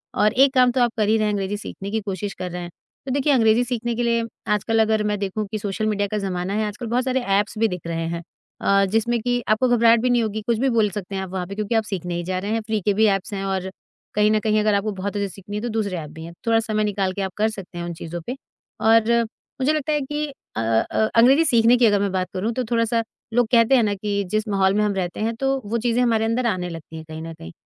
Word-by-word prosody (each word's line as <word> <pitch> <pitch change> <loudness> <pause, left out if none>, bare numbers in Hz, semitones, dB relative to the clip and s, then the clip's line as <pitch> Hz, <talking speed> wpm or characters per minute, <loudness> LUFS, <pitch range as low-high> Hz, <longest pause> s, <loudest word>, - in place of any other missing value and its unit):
और 210 0 +3
एक 270 +1 +5
काम 250 -2 +5
तो 250 0 0
आप 240 - +3
कर 215 -2 +2
ही 220 - +4
रहे 215 - +1
हैं, 210 - 0
अंग्रेज़ी 200 0 -2
सीखने 200 -1 -7
की 220 - 0
कोशिश 200 0 -4
कर 180 -1 -6
रहे 180 +1 -5
हैं। 175 - -6 0.4
तो 265 - -3
देखिए, 280 +2 +2
अंग्रेज़ी 230 -1 +4
सीखने 240 -1 -2
के 240 - -1
लिए 235 -1 +1 0.3
आजकल 225 +2 +1
अगर 220 -1 +2
मैं 210 0 0
देखूँ 200 +2 -2
कि 215 - -2
सोशल 205 +1 -2
मीडिया 205 -1 0
का 215 - 0
ज़माना 190 -1 -2
है, 215 +1 0
आजकल 210 +3 -6
बहुत 245 +3 +1
सारे 260 0 +1 0.2
ऐप्स 210 +2 -1
भी 225 - +4
दिख 180 -5 -5
रहे 165 0 -2
हैं 170 0 -4 0.4
अ, 195 0 +3
जिसमें 235 +2 +1
कि 245 +1 0
आपको 215 +4 +3
घबराहट 235 -1 +5
भी 250 - +1
नहीं 240 -1 +3
होगी। 215 0 -3
कुछ 235 -1 +2
भी 270 +2 +2
बोल 215 -2 +4
सकते 195 0 -6
हैं 190 - -2
आप 190 - -7
वहाँ 185 -2 -3
पे 200 - -7
क्योंकि 215 +2 -2
आप 225 - +3
सीखने 180 -4 -4
ही 175 - -2
जा 185 +1 -2
रहे 200 +3 -4
हैं। 225 0 0
फ़्री 215 0 -2
के 205 - +3
भी 220 +2 +3
ऐप्स 195 +2 -6
हैं 195 -1 -3
और 190 -1 -2 0.5
कहीं 210 +1 +4
न 215 - +3
कहीं 215 -1 +2
अगर 210 0 +2
आपको 200 +2 0
बहुत 195 +1 -4
अच्छे 200 -1 0
से - - -10
सीखनी 205 +1 -8
है 210 - -2
तो 240 - -3
दूसरे 210 -4 -2
ऐप 155 -3 -6
भी 160 +1 -10
हैं। 170 - -9
थोड़ा 225 0 +4
समय 215 -1 -1
निकाल 200 -2 -1
के 200 - -4
आप 190 -1 -3
कर 215 +1 +2
सकते 195 -4 -9
हैं 170 - -4
उन 170 - -4
चीज़ों 170 +1 -6
पे 250 - -3 0.5
और 225 0 +5 0.5
मुझे 280 +4 +3
लगता 305 0 -1
है 295 - +1
कि 295 +2 -2 0.3
अ - - +1
अ, 115 0 0 0.2
अंग्रेज़ी 265 +8 +6
सीखने 235 -3 +5
की 245 - +4
अगर 205 -2 +4
मैं 200 -1 0
बात 185 -1 -1
करूँ 205 +5 -1
तो 255 - -1
थोड़ा-सा 230 0 +1 0.3
लोग 240 0 +3
कहते 235 +2 +5
हैं 245 - +4
ना 205 -1 +1
कि 200 0 -2
जिस 215 +1 0
माहौल 195 -2 +2
में 210 +1 +2
हम 210 -1 +1
रहते 180 -2 -3
हैं 225 +2 -1
तो 270 +2 0
वो 220 +3 -1
चीज़ें 235 +1 +1
हमारे 225 -2 +2
अंदर 230 +3 0
आने 185 -5 -1
लगती 165 -1 -9
हैं 160 - -9
कहीं 155 0 -7
न 165 0 -6
कहीं। 80 - -11
215 Hz, 290 wpm, -22 LUFS, 195-230 Hz, 0.5 s, अंग्रेज़ी